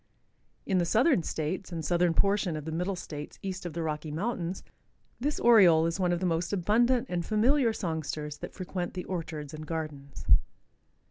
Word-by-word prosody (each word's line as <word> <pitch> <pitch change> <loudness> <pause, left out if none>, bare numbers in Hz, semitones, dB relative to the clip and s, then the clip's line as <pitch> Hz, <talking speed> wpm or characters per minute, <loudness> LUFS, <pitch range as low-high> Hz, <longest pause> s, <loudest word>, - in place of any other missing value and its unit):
In 190 -2 +2
the - - +2
southern 230 - +3
states 165 +4 -3
arid 165 -3 -4
southern 175 0 +2
portion 195 -3 +2
of 150 - -7
the 160 - -4
middle 180 +4 -1
states 150 -4 -7
east 190 -1 -4
of 165 - -7
the 165 +1 -3
Rocky 155 0 -3
mountains 180 +1 -3 0.6
this 290 +4 -1
Oriole 185 -9 +6
is 165 +3 -1
one 180 -1 +2
of 175 - 0
the 185 - -1
most 170 0 0
abundant 230 +6 +2
and 175 -1 -2
familiar 235 - +3
songsters 155 -6 -4
that - - -8
frequent 185 -1 -4
the 180 - -4
orchards 160 -4 -5
and 155 0 -7
gardens. 150 -4 -5
175 Hz, 180 wpm, -29 LUFS, 160-195 Hz, 0.6 s, Oriole